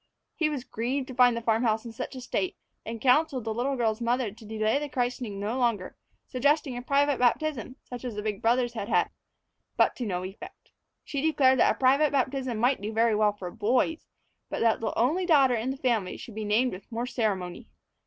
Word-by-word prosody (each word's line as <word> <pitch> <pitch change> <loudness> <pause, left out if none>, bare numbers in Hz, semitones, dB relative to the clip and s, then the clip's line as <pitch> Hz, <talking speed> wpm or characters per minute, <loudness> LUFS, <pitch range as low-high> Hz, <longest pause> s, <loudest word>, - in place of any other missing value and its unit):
He 315 -2 0
was 285 -5 -4
grieved 255 +3 -3
to - - -6
find 245 -1 +4
the 235 - -5
farm 225 0 +2
house 225 -1 +1
in 230 - -6
such 250 +4 -6
a 255 - -7
state, 355 +9 -2 0.3
and 225 0 -6
counseled 265 +1 +3
the 220 0 -2
little 255 +5 -1
girl's 225 -2 0
mother 235 -1 0
to 220 +2 -15
delay 220 +4 0
the 295 0 -5
christening 245 -5 -2
no 215 +6 -2
longer, 230 -7 0 0.3
suggesting 285 +1 +1
a 245 - -4
private 280 +1 +2
baptism, 255 0 0
such 245 -1 -8
as 245 -4 -5
the 210 - -4
big 210 -1 -3
brothers 240 +1 +2
had 210 -3 -5
had. - - +2 0.7
But - - +3
to 245 - -3
no 180 -2 -2
effect. 190 +2 -10 0.3
She 280 -2 -3
declared 270 -4 +3
that - - +4
a - - -21
private 275 +3 +4
baptism 260 -3 -1
might 245 +1 +2
do 210 +2 -3
very 225 0 +2
well 210 -1 +3
for 185 -4 -7
boys, 245 - 0 0.4
but - - -3
that 225 -1 +3
the 225 - -2
only 320 +10 +1
daughter 275 -6 +5
in 235 +2 -1
the 265 - -3
family 230 -8 0
should 230 - -10
be 215 0 -4
named 230 +5 +2
with 190 +5 -11
more 230 +2 -2
ceremony. 200 -8 -2
245 Hz, 215 wpm, -27 LUFS, 220-265 Hz, 0.7 s, daughter